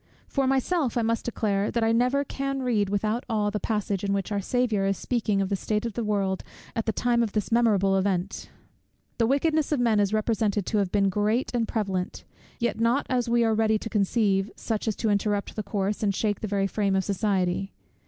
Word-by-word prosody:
For 270 -2 0
myself 270 0 +1
I 235 - +2
must 230 +1 0
declare, 205 -4 0
that 235 - 0
I 225 - +3
never 250 +4 +2
can 275 -1 -3
read 215 -6 +1
without 215 +4 0
awe 210 -2 +1
the 210 - -2
passage, 205 -3 -2
in 200 -1 0
which 200 +1 -2
our 200 -1 0
Saviour 225 -2 0
is 195 - 0
speaking 215 -5 0
of 190 - -3
the 200 - +1
state 210 +3 -2
of 230 - -3
the 235 - -2
world 195 -3 -1 0.3
at 225 -1 -2
the - - +3
time 235 +2 +1
of 225 -3 -1
this 210 0 -2
memorable 205 -5 +3
event. 190 -1 -1 0.7
The 230 - +3
wickedness 305 +3 +1
of 295 - +1
men 230 -3 +3
is 200 -1 +2
represented 215 -2 0
to 215 - 0
have 195 -3 0
been 200 -1 +3
great 210 +6 0
and 235 -2 0
prevalent; 195 -5 -2 0.3
yet 235 -3 -1
not 235 +5 +2
as 245 -2 +1
we 235 0 +3
are 225 -1 +2
ready 220 0 +2
to 225 - -6
conceive, 200 -2 +1
such 220 -1 -3
as 215 - 0
to 220 - 0
interrupt 205 0 0
the 215 - -2
course, 200 0 -2
and 200 -3 +1
shake 210 -1 0
the 215 - -3
very 200 -1 0
frame 195 0 0
of 190 - +2
society. 195 -1 0
215 Hz, 220 wpm, -26 LUFS, 200-235 Hz, 0.7 s, I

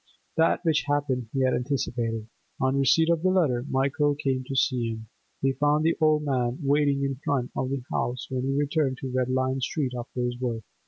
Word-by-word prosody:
That 165 +2 +2
which 155 -2 +2
happened 145 -4 0
he 135 - -1
had 130 0 +3
anticipated. 120 -4 -2 0.3
On 130 +1 +1
receipt 160 +5 +4
of 165 -2 +1
the 185 - +3
letter 155 -10 +2
Michael 145 +2 +1
came 135 -3 -1
to 135 0 -5
see 125 -3 +1
him; 110 0 -6 0.4
he 135 0 +3
found 145 +3 +2
the 165 +1 +3
old 155 -1 +4
man 125 -3 0
waiting 140 0 +2
in 135 -1 -1
front 130 -3 -1
of 130 - -1
the 135 -2 -3
house 120 +2 -1
when 130 -1 -1
he 135 +2 -1
returned 145 -2 0
to 130 - -4
Red 130 0 0
Lion 130 +1 0
Street 130 +1 -1
after 125 +1 -5
his 120 0 -2
work. 115 -3 -2
135 Hz, 205 wpm, -26 LUFS, 125-145 Hz, 0.4 s, receipt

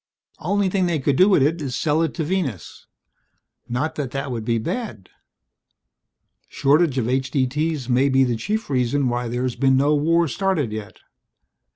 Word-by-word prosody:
Only 200 +4 0
thing 185 -1 +1
they 170 -2 0
could 140 -1 0
do 185 +7 +5
with 185 -9 +4
it 160 +3 0
is 130 -4 -3
sell 155 +3 +1
it 165 -3 -1
to 165 - -2
Venus. 155 - -4 0.8
Not 130 +7 -1
that 145 -5 -4
that 135 +1 -4
would 115 -3 -4
be 115 +1 0
bad. 115 - -5 1.4
Shortage 145 0 +2
of 120 -3 0
H.D.T.'s 135 +2 -1
may 130 +2 +2
be 135 0 +4
the 120 -2 0
chief 215 - -3
reason 130 +1 +1
why 120 0 -2
there's 125 +1 -2
been 135 +1 +3
no 145 +3 +3
war 165 +3 +2
started 160 - -1
yet. 105 -1 -7
140 Hz, 170 wpm, -22 LUFS, 125-165 Hz, 1.4 s, do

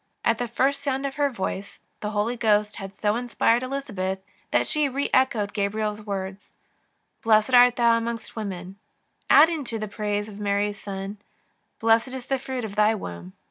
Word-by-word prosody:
At 230 -1 +2
the 245 - -1
first 270 +4 +1
sound 275 -1 -1
of 275 0 -4
her 290 -1 +2
voice 195 -4 -5 0.2
the 210 - -3
Holy 215 +3 0
Ghost 210 -2 +2
had 195 -2 -6
so 210 0 +1
inspired 240 -1 +2
Elizabeth 250 -8 -3 0.3
that - - +2
she 300 -2 +2
reechoed 260 -6 +1
Gabriel's 210 +1 -1
» 210 - -17
words: 195 0 -5 0.3
" - - -47
Blessed 220 +2 +3
art 245 0 +7
thou 235 -1 +4
among 230 0 -3 0.2
women," 190 -3 -6 0.5
adding 320 0 +6
to 230 -2 -3
them 215 -1 -4
the 205 - -16
praise 210 -1 -1
of 205 -1 -10
Mary's 205 0 -1
Son: 195 +1 -6 0.3
" - - -46
Blessed 225 +2 +3
is 255 -1 -7
the 270 -1 -1
fruit 255 -2 -4
of 205 -2 -7
thy 210 +1 +4
womb." 90 - -8
220 Hz, 185 wpm, -25 LUFS, 205-250 Hz, 0.5 s, art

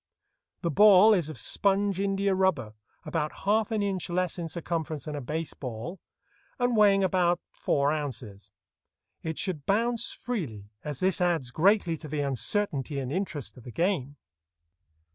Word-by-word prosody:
The 170 - 0
ball 210 +4 +7
is 170 -6 +1
of 155 - -7
sponge 195 - +1
india 195 0 +1
rubber, 185 - +1 0.3
about 155 -2 -1
half 215 +1 +2
an 215 -2 0
inch 190 -3 -2
less 180 0 -1
in 165 -1 -4
circumference 160 -3 -4
than 150 -1 -5
a 145 - -4
base 155 +5 -4
ball, 125 - -6 0.6
and 245 -1 +1
weighing 200 -2 +5
about 175 -2 +2
four 140 0 +1
ounces. 120 -10 -5 0.7
It 160 -1 -4
should 170 -8 -2
bounce 230 +3 +1
freely, 125 - -5
as 150 -3 -5
this 185 0 +1
adds 165 -8 +1
greatly 175 - +3
to 155 - -8
the 150 0 -2
uncertainty 140 - 0
and 130 -1 -3
interest 155 -7 -3
of 125 - -13
the 120 - -9
game. 165 - -1
170 Hz, 155 wpm, -28 LUFS, 145-195 Hz, 0.7 s, ball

